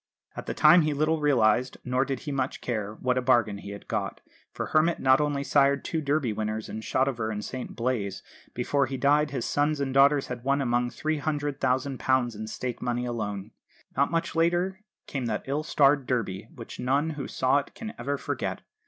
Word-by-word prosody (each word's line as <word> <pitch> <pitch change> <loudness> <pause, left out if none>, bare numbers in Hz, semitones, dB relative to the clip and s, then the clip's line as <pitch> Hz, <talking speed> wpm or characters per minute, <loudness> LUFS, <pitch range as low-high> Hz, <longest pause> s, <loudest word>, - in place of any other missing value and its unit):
At - - -7
the - - -3
time 175 0 +7
he 150 -2 0
little 155 +2 +1
realised 125 -3 +3
nor 125 +1 +1
did 135 -2 -3
he 145 - -5
much 135 -1 -2
care 110 -3 -3
what 125 +2 0
a - - -2
bargain 120 -5 +2
he 100 - -9
had 100 0 -9
got; - - -2 0.3
for - - -4
Hermit 160 +2 +3
not 130 +2 +4
only 145 -1 0
sired 140 0 +3
two 160 - -1
Derby 140 -5 0
winners 110 +1 -3
in 110 - -5
Shotover 120 -2 0
and 105 -1 -4
St 130 -1 -6
Blaise, 115 -6 -2 0.3
before 135 +3 +1
he 135 +1 -4
died 145 +2 +3
his 130 -4 -3
sons 145 +1 +1
and 135 -2 -1
daughters 140 +1 +5
had 120 -1 -6
won 140 +2 +2
among 120 -2 +1
them - - -11
£300,000 135 -5 0
in 110 +1 -6
stake 120 +2 -5
money 120 0 -1
alone. 105 -3 -4 0.4
Not 140 +1 +3
much 165 0 -1
later 175 +3 +1 0.3
came 130 -4 -3
that 110 -2 -2
ill 140 +3 -1
starred 145 -4 +3
Derby, 110 -5 -2
which 115 - -10
none 140 +5 +1
who 145 -3 -5
saw 130 +2 +2
it 140 - -9
can 225 -1 -6
ever 140 +1 -1
forget. - - -3
135 Hz, 195 wpm, -27 LUFS, 120-145 Hz, 0.4 s, time